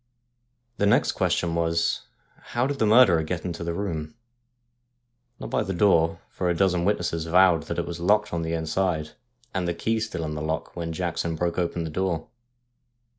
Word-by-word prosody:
The 100 Hz, -, +2 dB
next 105 Hz, -, +3 dB
question 85 Hz, -2 st, 0 dB
was: 85 Hz, -6 st, 0 dB, 0.5 s
How 120 Hz, -, +3 dB
did 140 Hz, 0 st, -2 dB
the 110 Hz, -, +3 dB
murderer 105 Hz, -7 st, +6 dB
get 85 Hz, +2 st, -4 dB
into 85 Hz, -1 st, -4 dB
the 85 Hz, 0 st, -3 dB
room? 80 Hz, -5 st, -4 dB, 1.2 s
Not -, -, -7 dB
by -, -, +1 dB
the 95 Hz, -, -3 dB
door, 85 Hz, -4 st, +3 dB
for 90 Hz, -, -1 dB
a 85 Hz, -, +1 dB
dozen 90 Hz, -1 st, +2 dB
witnesses 85 Hz, -5 st, 0 dB
vowed 90 Hz, -1 st, +4 dB
that -, -, -2 dB
it -, -, -1 dB
was 85 Hz, 0 st, -6 dB
locked 105 Hz, +3 st, +2 dB
on 85 Hz, -, -1 dB
the 80 Hz, 0 st, -2 dB
inside, 80 Hz, -1 st, -1 dB, 0.4 s
the 90 Hz, -2 st, -1 dB
key 110 Hz, +5 st, 0 dB
still 110 Hz, -7 st, -3 dB
in 75 Hz, -, -4 dB
the 75 Hz, -, -4 dB
lock, 80 Hz, +1 st, -3 dB
when 85 Hz, -1 st, -4 dB
Jackson 85 Hz, -1 st, -2 dB
broke 85 Hz, +2 st, -1 dB
open 85 Hz, -1 st, -1 dB
tlje 80 Hz, -, -6 dB
door. 90 Hz, -3 st, -1 dB
85 Hz, 180 wpm, -25 LUFS, 80-95 Hz, 1.2 s, murderer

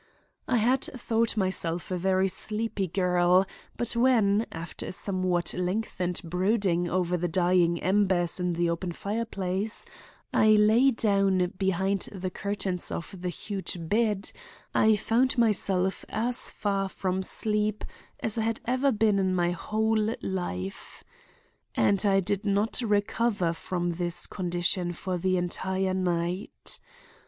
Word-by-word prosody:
"I 250 Hz, -, +2 dB
had 250 Hz, +4 st, +3 dB, 0.2 s
thought 230 Hz, -1 st, 0 dB
myself 180 Hz, -3 st, -1 dB
a -, -, +1 dB
very 190 Hz, +1 st, +2 dB
sleepy 210 Hz, 0 st, -1 dB
girl, 180 Hz, +1 st, +3 dB, 0.3 s
but 240 Hz, 0 st, -2 dB
when, 230 Hz, -4 st, +3 dB
after 165 Hz, 0 st, -6 dB
a -, -, -4 dB
somewhat 185 Hz, -2 st, 0 dB
lengthened 180 Hz, -1 st, -2 dB
brooding 180 Hz, 0 st, +1 dB
over 180 Hz, 0 st, 0 dB
the 175 Hz, +1 st, -1 dB
dying 175 Hz, 0 st, +2 dB
embers 185 Hz, -3 st, +2 dB
in 180 Hz, -1 st, 0 dB
the 170 Hz, +1 st, +1 dB
open 170 Hz, +1 st, -2 dB
fireplace, 200 Hz, 0 st, -2 dB, 0.5 s
I 215 Hz, 0 st, +5 dB
lay 215 Hz, +5 st, +5 dB
down 195 Hz, -6 st, +2 dB
behind 190 Hz, 0 st, 0 dB
the 185 Hz, -2 st, -4 dB
curtains 195 Hz, -2 st, -3 dB
of 170 Hz, -, -5 dB
the 180 Hz, -, -2 dB
huge 190 Hz, 0 st, -3 dB
bed, 210 Hz, +4 st, 0 dB, 0.4 s
I 220 Hz, 0 st, +5 dB
found 240 Hz, +5 st, +1 dB
myself 195 Hz, -4 st, +1 dB
as 240 Hz, +3 st, -1 dB
far 195 Hz, -2 st, -1 dB
from 190 Hz, -1 st, -2 dB
sleep 210 Hz, +2 st, -1 dB, 0.4 s
as 225 Hz, +1 st, 0 dB
I -, -, +1 dB
had 225 Hz, 0 st, -1 dB
ever 260 Hz, +3 st, +2 dB
been 210 Hz, -3 st, +2 dB
in 190 Hz, -1 st, +1 dB
my 175 Hz, -1 st, +2 dB
whole 220 Hz, +4 st, 0 dB
life. 95 Hz, -, -5 dB, 0.7 s
"And 190 Hz, -, +3 dB
I 195 Hz, -1 st, +4 dB
did 200 Hz, +2 st, -1 dB
not 205 Hz, +4 st, +1 dB
recover 205 Hz, -4 st, +1 dB
from 175 Hz, +1 st, -2 dB
this 175 Hz, 0 st, -2 dB
condition 175 Hz, -1 st, -1 dB
for 180 Hz, +1 st, -3 dB
the 185 Hz, +1 st, +1 dB
entire 190 Hz, +2 st, -1 dB
night. 180 Hz, 0 st, -2 dB
190 Hz, 135 wpm, -27 LUFS, 180-215 Hz, 0.7 s, I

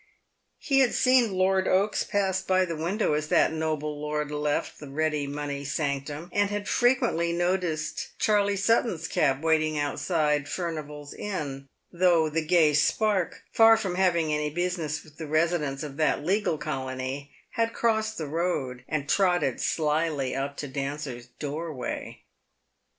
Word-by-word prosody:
He 275 Hz, -2 st, +1 dB
had 260 Hz, -3 st, +3 dB
seen 255 Hz, -4 st, +4 dB
Lord 190 Hz, 0 st, +2 dB
Oaks 200 Hz, +3 st, +2 dB
pass 190 Hz, -2 st, 0 dB
by 185 Hz, 0 st, +2 dB
the 170 Hz, -2 st, -4 dB
window 170 Hz, +4 st, 0 dB
as 150 Hz, 0 st, -1 dB
that 160 Hz, -, +3 dB
noble 155 Hz, -2 st, -2 dB
lord 150 Hz, 0 st, -2 dB
left 150 Hz, 0 st, -2 dB
the 145 Hz, -, -9 dB
ready 150 Hz, 0 st, -1 dB
money 145 Hz, 0 st, -4 dB
sanctum, 145 Hz, +1 st, -3 dB
and 205 Hz, 0 st, +2 dB
had 205 Hz, 0 st, -3 dB
frequently 240 Hz, -9 st, +2 dB
noticed 175 Hz, -3 st, -2 dB
Charley 205 Hz, -1 st, +2 dB
Sutton's 200 Hz, -5 st, +1 dB
cab 140 Hz, 0 st, +1 dB
waiting 155 Hz, -1 st, +2 dB
outside 150 Hz, -1 st, 0 dB
Furnival's 150 Hz, -4 st, -5 dB
Inn, 145 Hz, -9 st, -5 dB, 0.2 s
though 170 Hz, -3 st, +3 dB
the 165 Hz, +1 st, 0 dB
gay 160 Hz, -2 st, +4 dB
spark, 190 Hz, +5 st, +1 dB
far 225 Hz, 0 st, +7 dB
from 195 Hz, -5 st, -2 dB
having 170 Hz, -4 st, +2 dB
any 150 Hz, 0 st, 0 dB
business 165 Hz, -2 st, -2 dB
with 155 Hz, -1 st, -19 dB
the 160 Hz, -, -6 dB
residents 155 Hz, -3 st, 0 dB
of 145 Hz, -2 st, -7 dB
that 150 Hz, -1 st, +1 dB
legal 190 Hz, -3 st, +1 dB
colony, 135 Hz, -1 st, -4 dB, 0.2 s
had 230 Hz, 0 st, 0 dB
crossed 220 Hz, -1 st, 0 dB
the 160 Hz, -, -3 dB
road, 145 Hz, -6 st, -2 dB
and 150 Hz, -2 st, -2 dB
trotted 180 Hz, 0 st, +2 dB
slyly 150 Hz, -3 st, 0 dB
up 140 Hz, +1 st, -3 dB
to 145 Hz, -, -4 dB
Dancer's 135 Hz, -2 st, -5 dB
doorway. 150 Hz, -2 st, -5 dB
155 Hz, 145 wpm, -27 LUFS, 145-185 Hz, 0.2 s, far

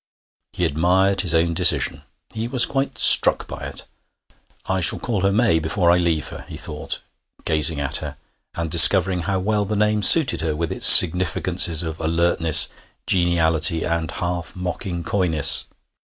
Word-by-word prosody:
He -, -, -4 dB
admired 95 Hz, +5 st, -2 dB
his 85 Hz, -3 st, 0 dB
own 85 Hz, +1 st, -2 dB
decision; -, -, +2 dB, 0.3 s
he 110 Hz, +1 st, -7 dB
was 125 Hz, -1 st, +4 dB
quite 135 Hz, 0 st, -6 dB
struck -, -, +3 dB
by -, -, -12 dB
it. -, -, -8 dB, 0.8 s
'I 95 Hz, 0 st, -5 dB
shall 90 Hz, -, +2 dB
call 110 Hz, -6 st, -6 dB
her 100 Hz, +1 st, -2 dB
May 105 Hz, -5 st, -1 dB
before 85 Hz, +2 st, -3 dB
I 90 Hz, -, 0 dB
leave 85 Hz, -3 st, -4 dB
her,' -, -, -13 dB
he -, -, -11 dB
thought, -, -, -8 dB, 0.4 s
gazing 80 Hz, 0 st, 0 dB
at 70 Hz, -1 st, -3 dB
her, -, -, -10 dB, 0.4 s
and 85 Hz, -2 st, -7 dB
discovering 90 Hz, +2 st, +5 dB
how 95 Hz, +3 st, -5 dB
well 105 Hz, +2 st, -4 dB
the 105 Hz, +2 st, -7 dB
name 105 Hz, 0 st, -2 dB
suited 130 Hz, -, +5 dB
her, 80 Hz, -1 st, -5 dB
with 85 Hz, +1 st, -6 dB
its -, -, +2 dB
significances 90 Hz, -1 st, +4 dB
of 80 Hz, -1 st, -9 dB
alertness, 85 Hz, -1 st, +2 dB, 0.4 s
geniality, 80 Hz, -2 st, +1 dB
and 85 Hz, -2 st, -5 dB
half 90 Hz, 0 st, -7 dB
mocking 90 Hz, -1 st, -8 dB
coyness. 80 Hz, -7 st, +1 dB
85 Hz, 160 wpm, -17 LUFS, 80-95 Hz, 0.8 s, discovering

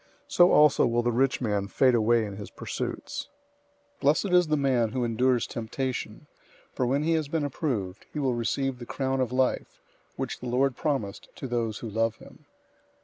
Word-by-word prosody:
So 175 Hz, 0 st, +5 dB
also 150 Hz, -3 st, +5 dB
will 120 Hz, 0 st, +1 dB
the 120 Hz, -, +1 dB
rich 130 Hz, +3 st, +1 dB
man 105 Hz, -4 st, 0 dB
fade 130 Hz, +5 st, +3 dB
away 115 Hz, 0 st, +3 dB
in 100 Hz, -1 st, -7 dB
his 105 Hz, -, -7 dB
pursuits. -, -, -5 dB, 0.7 s
001:012 -, -, -39 dB
Blessed 150 Hz, +7 st, +3 dB
is 180 Hz, -2 st, +5 dB
the 155 Hz, 0 st, +1 dB
man 130 Hz, -5 st, +2 dB
who 130 Hz, -1 st, -1 dB
endures 120 Hz, +1 st, +2 dB
temptation, 125 Hz, +2 st, -4 dB, 0.5 s
for 125 Hz, -, 0 dB
when 140 Hz, +4 st, +1 dB
he 165 Hz, -, +1 dB
has 160 Hz, -2 st, 0 dB
been 150 Hz, 0 st, -1 dB
approved, 115 Hz, -, -3 dB
he -, -, -7 dB
will 135 Hz, -4 st, +1 dB
receive 125 Hz, +2 st, -1 dB
the 120 Hz, -, -9 dB
crown 135 Hz, -1 st, -1 dB
of 125 Hz, -2 st, -1 dB
life, 130 Hz, 0 st, 0 dB, 0.4 s
which -, -, -4 dB
the 125 Hz, -, -6 dB
Lord 130 Hz, +1 st, +2 dB
promised 135 Hz, -11 st, -3 dB
to -, -, -7 dB
those 115 Hz, -4 st, -2 dB
who 115 Hz, -, -6 dB
love 115 Hz, +1 st, 0 dB
him. -, -, -16 dB
125 Hz, 190 wpm, -27 LUFS, 115-140 Hz, 0.7 s, So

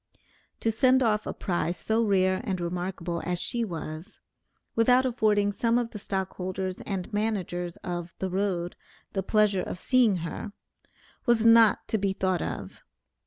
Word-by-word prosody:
To 225 Hz, -, +2 dB
send 255 Hz, +3 st, +4 dB
off 215 Hz, -2 st, +1 dB
a -, -, -3 dB
prize 175 Hz, -2 st, -1 dB
so 225 Hz, +1 st, +1 dB
rare 185 Hz, -2 st, +2 dB
and 190 Hz, -6 st, -2 dB
remarkable, 175 Hz, -1 st, -3 dB
as 180 Hz, 0 st, +2 dB
she 235 Hz, +4 st, 0 dB
was, 160 Hz, -4 st, -6 dB, 0.6 s
without 250 Hz, +3 st, +4 dB
affording 215 Hz, -5 st, +2 dB
some 230 Hz, +3 st, +1 dB
of 240 Hz, -1 st, -1 dB
the 210 Hz, -, -7 dB
stockholders 185 Hz, -1 st, -3 dB
and 195 Hz, -1 st, -4 dB
managers 185 Hz, -5 st, -2 dB
of 175 Hz, 0 st, -5 dB
the 190 Hz, -1 st, -3 dB
Road 185 Hz, -2 st, -1 dB, 0.4 s
the 195 Hz, -, 0 dB
pleasure 205 Hz, -1 st, +2 dB
of -, -, -5 dB
seeing 240 Hz, 0 st, +3 dB
her, 200 Hz, +5 st, -6 dB, 0.7 s
was 235 Hz, -2 st, +3 dB
not 230 Hz, -2 st, +6 dB
to 220 Hz, -, 0 dB
be 195 Hz, -1 st, 0 dB
thought 185 Hz, -2 st, 0 dB
of. -, -, -5 dB
195 Hz, 155 wpm, -27 LUFS, 180-225 Hz, 0.7 s, not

